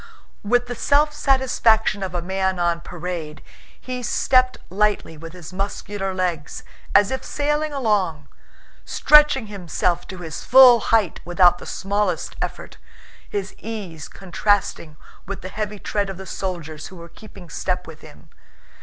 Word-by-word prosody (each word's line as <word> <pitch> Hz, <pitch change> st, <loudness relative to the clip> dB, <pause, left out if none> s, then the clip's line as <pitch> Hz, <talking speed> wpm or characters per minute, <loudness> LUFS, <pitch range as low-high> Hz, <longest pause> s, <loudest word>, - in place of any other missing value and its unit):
With 245 Hz, +4 st, +2 dB
the 245 Hz, -, -5 dB
self 295 Hz, +5 st, +2 dB
satisfaction 255 Hz, -7 st, +2 dB
of 185 Hz, -2 st, -4 dB
a 175 Hz, -, -2 dB
man 190 Hz, 0 st, -1 dB
on 170 Hz, -1 st, 0 dB
parade, 170 Hz, -4 st, -6 dB, 0.4 s
he 255 Hz, -1 st, -5 dB
stepped 255 Hz, +1 st, +2 dB
lightly 205 Hz, -4 st, 0 dB
with 165 Hz, +2 st, -10 dB
his 180 Hz, -1 st, -11 dB
muscular 195 Hz, 0 st, -3 dB
legs 180 Hz, -5 st, -3 dB, 0.3 s
as 205 Hz, 0 st, +5 dB
if 265 Hz, -, -3 dB
sailing 295 Hz, +1 st, -1 dB
along, 205 Hz, -, 0 dB, 0.6 s
stretching 300 Hz, -5 st, +5 dB
himself 180 Hz, -3 st, -2 dB
to 185 Hz, -, -8 dB
his 165 Hz, -4 st, -7 dB
full 250 Hz, -2 st, +8 dB
height 220 Hz, -7 st, +1 dB
without 175 Hz, 0 st, +4 dB
the -, -, -10 dB
smallest 200 Hz, -3 st, -2 dB
effort, -, -, -5 dB, 0.5 s
his 200 Hz, -1 st, -4 dB
ease 195 Hz, -9 st, -7 dB
contrasting 190 Hz, -4 st, -1 dB, 0.3 s
with 200 Hz, -, -5 dB
the 185 Hz, -, -5 dB
heavy 210 Hz, +1 st, -4 dB
tread 200 Hz, 0 st, -2 dB
of 190 Hz, -, -6 dB
the 190 Hz, -, -8 dB
soldiers 165 Hz, -6 st, -5 dB
who 190 Hz, -, -12 dB
were 170 Hz, -1 st, -10 dB
keeping 195 Hz, -1 st, -14 dB
step 180 Hz, +3 st, -3 dB
with 155 Hz, -1 st, -12 dB
him. 155 Hz, +1 st, -16 dB
195 Hz, 145 wpm, -22 LUFS, 175-225 Hz, 0.6 s, full